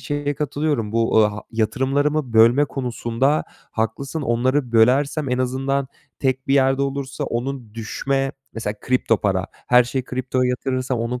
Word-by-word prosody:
şeye 145 -1 -2
katılıyorum, 145 -6 -1
bu, 115 -1 +2
aaa, 105 -1 -2
yatırımlarımı 135 +5 0
bölme 115 +6 +6
konusunda 130 +1 -1 0.3
haklısın. 135 +8 -3
Onları 125 +1 0
bölersem, 135 +5 +3
en 125 - 0
azından 135 +2 -1 0.3
tek 130 0 -1
bir 135 - +4
yerde 135 0 +3
olursa 140 -1 -3
onun 120 -2 -4
düşme, 135 +4 -2 0.2
mesela 110 -2 -3
kripto 125 -3 +2
para, 95 -2 0 0.2
her 125 0 +6
şeyi 125 +1 -3
kriptoya 130 0 -1
yatırırsam 130 0 -2
onun, 120 +2 -2
130 Hz, 140 wpm, -21 LUFS, 115-140 Hz, 0.3 s, bölme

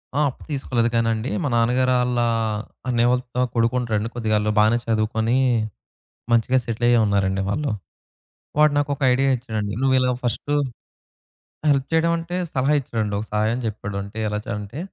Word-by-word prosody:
ఆ! - - +2
అప్పు - - -12
తీసుకోలేదు 120 -4 0
కానండి. 115 +1 0
మా - - 0
నాన్నగారు 125 +2 +3
ఆళ్ళ 125 0 0 0.7
అన్నయ్య 120 -1 +2
వాళ్ళ 125 0 +2
త - - 0 0.2
కొడుకు 115 +1 +2
ఉంటాడండి. 110 -2 -1
కొద్దిగా 110 -2 0
ఆళ్ళు 105 0 0
బానే 110 +2 +4
చదువుకొని 110 +2 +1 1.0
మంచిగా 120 +3 +3
సెటిల్ 115 0 -3
అయ్యే 120 -1 +5
ఉన్నారండి 95 -1 +1
వాళ్ళు. 140 +7 -1 0.9
వాడు 150 -1 +5
నాకొక 145 0 -1
ఐడియా 135 +2 +2
ఇచ్చాడండి. 110 -4 -4
నువ్వు 135 -1 +3
ఇలా 125 0 +2
ఫస్ట్ 120 +5 -2 1.2
హెల్ప్ 140 -2 +3
చేయడం 165 +1 +3
అంటే 170 +2 -5 0.2
సలహా 135 +3 +2
ఇచ్చాడండి 110 -5 -2
ఒక 105 - -4
సహాయం 110 +3 +1
చెప్పాడు. 100 -2 -5
అంటే 100 +2 -10
ఎలా 105 0 -2
చ - - -14
అంటే, 105 +9 -7
115 Hz, 160 wpm, -22 LUFS, 110-130 Hz, 1.2 s, అయ్యే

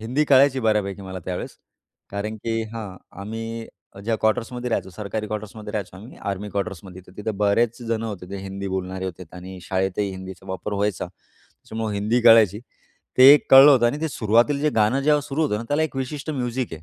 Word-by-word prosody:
हिंदी 125 +7 0
कळायची 135 -1 +5
बऱ्यापैकी 105 -3 0
मला 95 -1 -6
त्यावेळेस 90 -1 -5 0.5
कारण 105 +2 -4
की 115 +1 -2
हां, 105 -5 -7 0.2
आम्ही 115 +2 -5 0.4
ज्या 115 0 0
क्वार्टर्समध्ये 115 +3 -1
राहायचो, 95 -4 -1
सरकारी 105 +3 -5
क्वार्टर्समध्ये 105 0 -6
राहायचो 100 -3 -4
आम्ही, 110 +7 -12
आर्मी 100 +1 -4
क्वार्टर्समध्ये. 100 -2 -5
तर - - -16
तिथं 105 0 -4
बरेच 110 +4 +1
जणं 115 0 -1
होते 95 -4 -7
ते 100 - -4
हिंदी 100 0 -5
बोलणारे 95 0 -4
होते 90 0 -6
आणि 95 +1 -9
शाळेतही 95 +2 -1
हिंदीचा 95 0 -9
वापर 95 +2 -4
व्हायचा. 100 -2 -1
त्याच्यामुळं 110 -1 -9
हिंदी 105 +4 +1
कळायची. 115 -4 +6 0.6
ते - - +8
एक 145 - +4
कळलं 135 +2 +10
होतं 125 -4 +5
आणि 145 +6 -1
ते 160 - -1
सुरुवातील 120 +3 +2
जे 150 +1 +2
गाणं 110 +6 +3
जेव्हा 150 +1 +3
सुरू 145 +3 -1
होतं 140 -9 +1
ना - - -5
त्याला 145 +2 +1
एक 155 -4 -3
विशिष्ट 140 +3 -4
म्युझिक 125 - -3
आहे. 80 0 -8
110 Hz, 190 wpm, -23 LUFS, 100-120 Hz, 0.6 s, कळलं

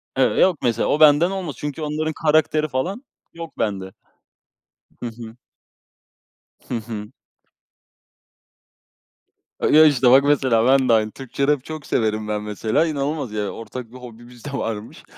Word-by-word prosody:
Eve 135 -1 +2
Yok, 185 -5 +4
mesela 115 -2 +1
o, 150 - +1
benden 155 +3 +5
olmaz. 185 -8 -4
Çünkü, 150 +1 -5
onların 155 +1 -2
karakteri 155 0 +2
falan, 175 - -3 0.3
yok 165 -1 -9
bende. 100 -3 -2 1.2
Hı - - -2
hı. 115 0 -11 1.3
Hı - - -4
hı. 110 -2 -7 2.5
A - - +1
ya, 155 +1 +7
işte 130 -4 +4
bak, 135 +2 +7
mesela 130 -6 +2
ben 130 -1 +3
de - - +5
aynı, 110 -1 +2
Türkçe 135 +2 -4
rap 145 -3 +1
çok 155 -1 -8
severim 110 -1 -1
ben 105 0 -2
mesela, 110 +8 0
inanılmaz 145 -3 -3
yani, 105 -2 -3
ortak 115 +1 -8
bir 130 - -11
hobimiz 120 0 -13
de 145 - -6
varmış, 115 -5 -5
130 Hz, 145 wpm, -21 LUFS, 115-150 Hz, 2.5 s, ya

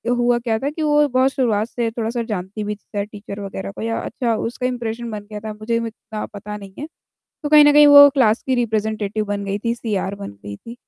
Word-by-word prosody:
हुआ 240 0 +2
क्या 230 -2 -1
था 275 +4 -1
कि 310 +2 -6
वो 295 -1 +3
बहुत 260 0 +2
शुरुआत 225 -5 0
से 235 -2 -2
थोड़ा-सा 230 +1 -2
जानती 210 -1 -5
भी 210 0 -3
थी 205 0 -5
टीचर 205 -1 -9
वगैरह 195 -1 -6
को - - -9
या 225 +1 -2
अच्छा 235 -3 -2
उसका 240 +3 -3
इम्प्रेशन 240 -1 -4
बन 210 -1 -6
गया 210 - -5
था, 215 0 -6
मुझे 215 +2 -3
इतना 225 -2 -5
पता 210 +1 -8
नहीं 195 -2 -12
है। 295 - -5 0.6
तो 295 - -2
कहीं 300 0 +8
न 290 - +6
कहीं 295 0 +8
वो 285 0 +10
क्लास 240 -5 +2
की 260 - +1
रिप्रेज़ेंटेटिव 215 -3 -1
बन 205 -1 -3
गई 200 0 -2
थी, 230 +2 -1
सीआर 205 -5 -3
बन 200 0 -7
गई 100 0 -7
थी, 230 - -11
225 Hz, 230 wpm, -20 LUFS, 210-245 Hz, 0.6 s, वो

